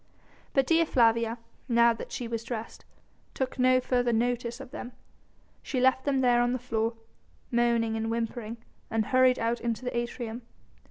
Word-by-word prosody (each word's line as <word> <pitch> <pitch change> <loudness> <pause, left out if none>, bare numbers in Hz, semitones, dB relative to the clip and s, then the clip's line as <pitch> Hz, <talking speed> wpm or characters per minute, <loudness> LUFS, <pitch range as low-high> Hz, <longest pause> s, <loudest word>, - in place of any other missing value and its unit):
But 270 -1 +3
Dea 330 +3 +4
Flavia, 230 -4 +2 0.3
now 235 0 +5
that 225 - -9
she 245 - -4
was 230 -1 -3
dressed, 230 -1 -6 0.5
took 265 0 -3
no 255 0 +5
further 245 -1 +1
notice 240 +1 -1
of 270 -1 -10
them; 250 -4 -7 0.7
she 260 - -3
left 260 +1 +3
them 275 -2 +2
there 245 -1 +4
on 245 +1 +1
the - - 0
floor, 230 -2 -1 0.6
moaning 235 -2 +2
and 225 0 -2
whimpering, 230 0 -3 0.3
and 225 -1 0
hurried 255 +1 +4
out 230 +1 -1
into 235 +1 -2
the 250 - -3
atrium. 235 0 -3
240 Hz, 165 wpm, -28 LUFS, 230-255 Hz, 0.7 s, now